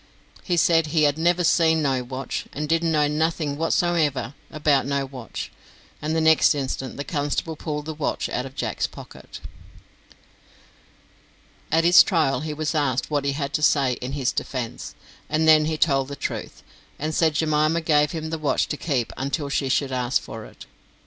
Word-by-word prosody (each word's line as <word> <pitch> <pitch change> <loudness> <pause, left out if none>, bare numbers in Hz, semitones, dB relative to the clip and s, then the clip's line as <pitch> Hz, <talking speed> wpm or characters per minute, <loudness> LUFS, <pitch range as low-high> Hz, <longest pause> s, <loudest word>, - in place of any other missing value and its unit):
He 175 -2 -1
said 165 -1 +3
he 155 0 +2
"had 145 +1 +2
never 175 +2 +2
seen 160 -1 +3
no 135 -3 0
watch, 130 +2 -5
and 150 +2 -3
didn't 165 +1 +1
know 150 -2 +3
nothing 155 -1 -1
whatsomever 160 -4 0 0.2
about 145 -3 +1
no 140 -1 0
watch," 130 -4 -7 0.5
and 155 +2 -2
the - - +2
next 160 -1 +5
instant 135 -2 -4
the 140 - -3
constable 145 +1 -2
pulled 150 -1 -4
the 160 - -4
watch 150 -1 -2
out 125 +2 -3
of 135 - -14
Jack's - - -2
pocket. - - -12 2.3
At 165 +1 +3
his 175 +1 +8
trial 160 -8 +2
he 155 +1 -4
was 155 +1 -2
asked 145 -3 0
what 145 -2 0
he 140 - +1
had 140 +1 -4
to 150 - 0
say 140 -4 +3
in 125 +2 -4
his 135 -3 0
defence, 125 -4 -5 0.3
and 155 +1 +1
then 155 -1 +6
he 155 0 -1
told 135 -4 +2
the 140 - -6
truth, - - -5 0.3
and 155 +2 -3
said 160 -1 +2
Jemima 155 +1 +1
gave 150 -2 +2
him 160 -1 -5
the 160 - -3
watch 150 -2 +1
to 150 - -3
keep 135 -8 -2
until 140 +2 -2
she 140 -1 -1
should 135 +1 +1
ask 125 0 0
for - - -9
it. - - -13
150 Hz, 180 wpm, -23 LUFS, 140-160 Hz, 2.3 s, his